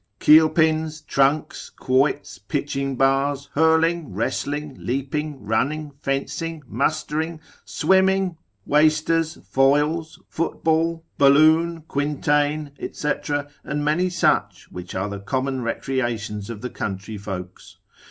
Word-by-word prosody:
Keelpins, 155 0 +4
tronks, 140 +1 0
quoits, 130 -8 0
pitching 135 +5 -3
bars, 135 +2 +1
hurling, 160 - +2
wrestling, 145 +5 -2
leaping, 140 0 -3
running, 145 +8 -1
fencing, 150 +3 -3
mustering, 155 +7 -1 0.3
swimming, 190 +1 +2 0.3
wasters, 155 +2 +2
foils, 150 +4 +1
football, 165 0 -1
balloon, 155 +4 +5
quintain, 145 +1 0 0.2
&c., 150 - -1 0.5
and 145 0 -3
many 175 +5 +2
such, 180 - 0
which 90 0 -8
are 95 +2 -1
the 100 -1 -6
common 130 +5 -2
recreations 115 -4 -3
of 110 -3 -7
the 125 - -5
country 100 +2 -5
folks. 95 -2 -8
145 Hz, 100 wpm, -23 LUFS, 130-160 Hz, 0.5 s, balloon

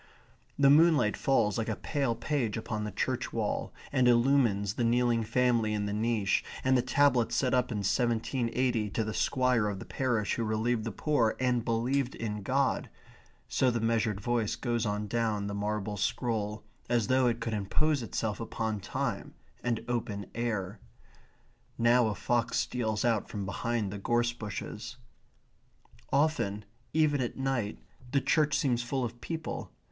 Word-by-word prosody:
The 140 -1 +6
moonlight 150 -8 +5
falls 110 -6 +2
like 115 - -2
a 110 - -1
pale 135 -3 -1
page 120 -4 -1
upon 110 -1 -3
the 105 - -4
church - - -2
wall, - - -2 0.2
and 130 -3 +3
illumines 120 -5 +3
the 120 - -1
kneeling 120 0 +2
family 115 -1 +2
in 105 -1 -1
the 100 - -2
niche, 110 -2 +1 0.2
and 130 0 +3
the 125 - +4
tablet 125 -2 +3
set 125 +2 +1
up 125 -1 +2
in 105 -3 -2
1780 120 0 0
to 110 - -1
the 110 0 -4
Squire 125 -4 +2
of 100 -2 -2
the 95 - -8
parish 120 -6 0
who 115 - -1
relieved 110 +1 0
the 115 - -2
poor, 120 -2 +1
and 125 -2 +1
believed 120 +3 0
in 105 -2 -4
God 135 +6 0 0.6
so 130 - +2
the 120 -1 0
measured 115 -2 +1
voice 115 0 0
goes 120 -2 -1
on 105 +1 -1
down 110 -2 -1
the 100 - -3
marble 105 0 -2
scroll, 105 0 -1 0.3
as 120 -2 +2
though 130 +2 +3
it 115 -1 0
could 115 -1 -3
impose 135 +8 +1
itself 110 -1 -3
upon 110 -2 -3
time - - -3 0.3
and 120 -2 +1
the - - -10
open 105 -4 -2
air. 105 -5 -2 1.0
Now 120 0 +4
a 105 - -1
fox 120 +1 0
steals 110 -3 -1
out 115 -4 +1
from 100 -2 -4
behind 110 +1 -2
the 100 - -5
gorse 120 +3 +1
bushes. 105 -5 -6 1.2
Often, 135 -9 +1 0.3
even 150 -3 +2
at 120 - -3
night, 135 -6 -1 0.3
the 140 - +3
church 150 +1 +2
seems 125 -5 +1
full 125 +1 -1
of 120 +1 -7
people. 165 -1 -5
115 Hz, 165 wpm, -30 LUFS, 105-125 Hz, 1.2 s, The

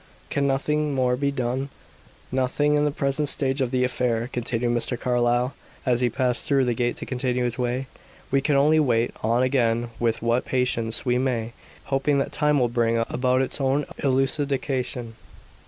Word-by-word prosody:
"Can 140 0 +1
nothing 150 +2 0
more 125 -1 +2
be 140 +2 0
done?" 130 0 -2 0.6
"Nothing 130 +3 +1
in 150 0 +3
the - - +2
present 140 0 -1
stage 135 0 0
of 130 - +1
the 125 0 +1
affair," 125 -1 -1
continued 120 0 -1
Mr. 120 0 0
Carlyle, 120 +1 +1 0.3
as 125 -2 +2
he 125 - +3
passed 125 0 -1
through 135 -2 +3
the 120 - +1
gate 120 +1 -1
to - - -7
continue 125 -1 -1
his 120 +1 -2
way. 125 +2 -1 0.5
"We 135 0 +3
can 145 +1 +1
only 150 +3 +4
wait 120 -5 +1
on 115 +3 +2
again 120 -3 +1
with 115 -1 0
what 120 +2 +2
patience 120 -3 -1
we 125 0 +2
may, 120 -3 -1 0.3
hoping 140 +1 +1
that 135 - -1
time 150 -1 +2
will 125 -3 +3
bring 115 -1 +1
about 130 +1 +2
its 135 - -4
own 135 +2 +1
elucidation." 135 -3 -1
125 Hz, 175 wpm, -24 LUFS, 120-140 Hz, 0.6 s, only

